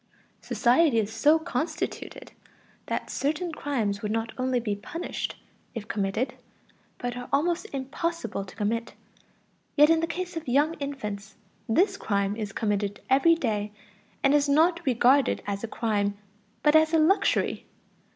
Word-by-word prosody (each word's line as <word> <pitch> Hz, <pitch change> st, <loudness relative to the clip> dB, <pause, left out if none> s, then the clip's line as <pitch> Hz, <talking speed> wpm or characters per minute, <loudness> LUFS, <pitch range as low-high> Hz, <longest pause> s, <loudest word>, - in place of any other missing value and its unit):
Society 255 Hz, +2 st, +3 dB
is 220 Hz, 0 st, 0 dB
so 300 Hz, +2 st, +5 dB
constituted 320 Hz, +2 st, -4 dB, 0.6 s
that -, -, -3 dB
certain 315 Hz, +5 st, -1 dB
crimes 230 Hz, -10 st, -2 dB
would 210 Hz, -, -2 dB
not 225 Hz, +1 st, -1 dB
only 255 Hz, -1 st, 0 dB
be 215 Hz, -3 st, -2 dB
punished 330 Hz, +12 st, -5 dB, 0.4 s
if 215 Hz, -2 st, -5 dB
committed, 205 Hz, +4 st, -1 dB, 0.6 s
but 245 Hz, 0 st, -4 dB
are 245 Hz, 0 st, -7 dB
almost 340 Hz, +8 st, +1 dB
impossible 275 Hz, -, -3 dB
to 190 Hz, -, -13 dB
commit. 230 Hz, +2 st, -2 dB, 0.8 s
Yet 295 Hz, +2 st, +7 dB
in 330 Hz, -, +4 dB
the 330 Hz, -, 0 dB
case 355 Hz, +1 st, -4 dB
of 325 Hz, -3 st, -5 dB
young 290 Hz, +6 st, +3 dB
infants, 210 Hz, -8 st, -5 dB, 0.3 s
this 385 Hz, -, +3 dB
crime 200 Hz, -, 0 dB
is 210 Hz, -2 st, -4 dB
committed 205 Hz, -1 st, -1 dB
every 305 Hz, +5 st, +6 dB
day, 210 Hz, -8 st, -2 dB, 0.5 s
and 275 Hz, -, +4 dB
is 290 Hz, -1 st, +3 dB
not 330 Hz, +4 st, +4 dB
regarded 255 Hz, +2 st, +3 dB
as 200 Hz, 0 st, -3 dB
a -, -, -2 dB
crime, 205 Hz, -3 st, -1 dB, 0.5 s
but 300 Hz, 0 st, +5 dB
as 315 Hz, +1 st, +5 dB
a -, -, +6 dB
luxury. 320 Hz, +6 st, +2 dB
255 Hz, 145 wpm, -27 LUFS, 210-315 Hz, 0.8 s, Yet